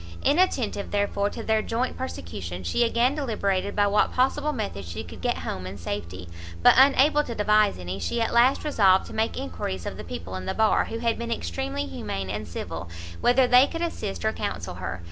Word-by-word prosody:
Inattentive, 275 - +1
therefore, 205 0 0
to 230 - -7
their 220 0 +2
joint 235 +4 -2
persecution, 90 +1 -6
she 90 - +1
again 235 +3 +2
deliberated 200 -9 -1
by 205 - +3
what 205 +1 +2
possible 280 +4 +1
method 210 - -4
she 85 -1 -6
could - - -11
get - - 0
home 90 0 -5
in 95 +2 -7
safety; 90 -1 -5 0.4
but - - +8
unable 280 +3 +5
to 235 -5 -6
devise 210 0 +3
any, 90 +1 -5
she 90 - -2
at 225 - 0
last 245 +3 +4
resolved 195 -11 +4
to - - -10
make 220 +1 -1
enquiries 90 +1 -4
of - - -5
the - - -7
people 85 +2 -7
in 95 0 -6
the - - -2
bar, 220 -1 +3
who 225 - -5
had 230 0 -1
been 235 0 -4
extremely 90 - -3
humane 95 +1 -5
and 105 +1 -4
civil, 85 0 -6 0.3
whether 245 +2 +4
they 250 +2 +6
could 330 0 -4
assist 95 - -4
or - - +2
counsel - - -4
her. 90 - -5
205 Hz, 200 wpm, -25 LUFS, -, 0.4 s, but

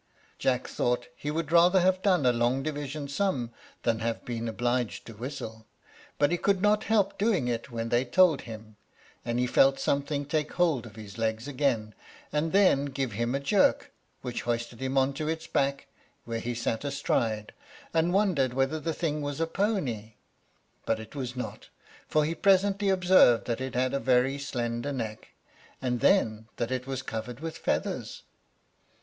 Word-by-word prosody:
Jack 125 -1 +1
thought 120 0 -1
he 145 - -5
would 160 0 -2
rather 175 +2 +6
have 185 +1 +2
done 185 -8 +3
a 125 - +5
long 120 +3 +1
division 145 -1 -4
sum 140 -6 -1 0.3
than 115 -1 +1
have 115 0 -3
been 115 -1 -3
obliged 120 +1 -1
to 115 - -9
whistle; 110 -2 -7 0.5
but 145 +2 +3
he 175 - +1
could 200 0 +2
not 210 +2 +2
help 205 -4 +1
doing 200 - +2
it 120 +1 -2
when 115 -1 -3
they 120 +1 +3
told 160 +4 +4
him, 110 -2 -10 0.5
and 120 0 -2
he 125 - +2
felt 135 +2 +4
something 140 0 0
take 150 +1 -1
hold 160 -10 +1
of 110 - -14
his 110 0 -10
legs 110 +2 -1
again, 125 -6 0 0.4
and 150 +2 0
then 185 -8 +4
give 135 -3 -2
him 120 +5 -1
a - - 0
jerk, 190 +8 +2 0.3
which 125 -1 -3
hoisted 120 0 -3
him 135 +1 -1
on 135 +1 +3
to 150 +2 -4
its 160 0 -2
back, 140 0 0 0.4
where 115 -1 -3
he 120 +1 -3
sat 115 0 -2
astride, 115 -6 -1 0.4
and 165 +1 +2
wondered 175 -11 +2
whether 135 +4 +1
the 160 +1 -3
thing 150 -3 -1
was 145 0 -4
a 165 - +2
pony; 155 - -2 0.7
but 115 -1 0
it 110 0 -10
was 130 -3 -4
not, 125 - -6 0.4
for 155 -1 +2
he 160 - -1
presently 195 +2 +3
observed 180 - +5
that 120 +1 -2
it 130 -1 -4
had 130 +1 +1
a 140 - +1
very 130 +3 +2
slender 120 -1 -3
neck, 110 -5 -5 0.5
and 125 -1 -1
then 110 - +2
that 120 +1 -2
it 130 0 -2
was 135 -1 -3
covered 115 0 -5
with 160 +1 -5
feathers. - - -2
135 Hz, 180 wpm, -28 LUFS, 120-160 Hz, 0.7 s, rather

